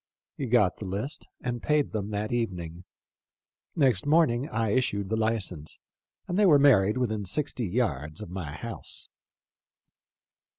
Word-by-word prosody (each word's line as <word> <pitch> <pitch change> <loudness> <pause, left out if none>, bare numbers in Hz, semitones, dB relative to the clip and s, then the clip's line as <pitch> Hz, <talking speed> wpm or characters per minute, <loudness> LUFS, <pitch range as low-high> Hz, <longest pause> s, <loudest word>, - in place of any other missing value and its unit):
He 135 - -3
got 110 -6 +3
the 105 - -7
list 100 +10 -4 0.2
and 120 -2 -3
paid 150 -1 +1
them 105 -2 -3
that 105 0 -2
even 115 -7 -1
ing. 85 +1 -8 0.9
Next 130 - +2
morning 145 -4 +3
I 115 -5 0
issued 100 -5 0
the 110 - +1
license, 110 -9 -1 0.5
and 180 +3 -1
they 210 - +6
were 150 -5 +7
married 115 -7 +5
within 110 -5 -1
sixty 125 +3 -1
yards 90 -8 -1
of 90 - -10
my 90 -6 -5
house." 70 - -6
110 Hz, 145 wpm, -28 LUFS, 95-130 Hz, 0.9 s, were